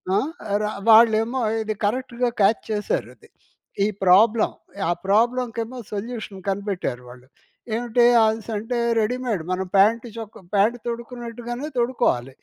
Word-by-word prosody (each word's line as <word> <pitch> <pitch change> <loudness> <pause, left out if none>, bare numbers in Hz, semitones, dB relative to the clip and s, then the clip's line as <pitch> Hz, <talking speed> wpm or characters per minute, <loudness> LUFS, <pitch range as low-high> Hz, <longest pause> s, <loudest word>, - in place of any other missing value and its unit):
ఆ! - - +4
ఆహ్, 215 - -2
ర - - 0 0.2
వాళ్ళేమో 225 +3 +5 0.2
ఇది 215 0 -3
కరెక్ట్‌గా 245 +2 -1
క్యాచ్ 200 +3 +4
చేశారది. 210 -1 -3 0.6
ఈ - - +2 0.2
ప్రాబ్లమ్. 210 +5 +4 0.3
ఆ - - +3 0.2
ప్రాబ్లంకేమో 235 +2 0 0.2
సొల్యూషన్ 215 -1 -5
కనిపెట్టారు 195 - -3
వాళ్ళు. 125 +1 -14 0.5
ఏమిటి 240 +1 +1 0.2
అనేసంటే 220 +1 -1 0.2
రెడీమేడ్ 235 -4 -1
మనం 185 +1 -1
ప్యాంట్ 220 +5 +4
చొక్క 220 -2 -8 0.2
ప్యాంట్ 220 +5 +3
తొడుకున్నట్టుగానే 240 +2 -5
తొడుక్కోవాలి. 235 - 0
225 Hz, 115 wpm, -23 LUFS, 205-240 Hz, 0.6 s, వాళ్ళేమో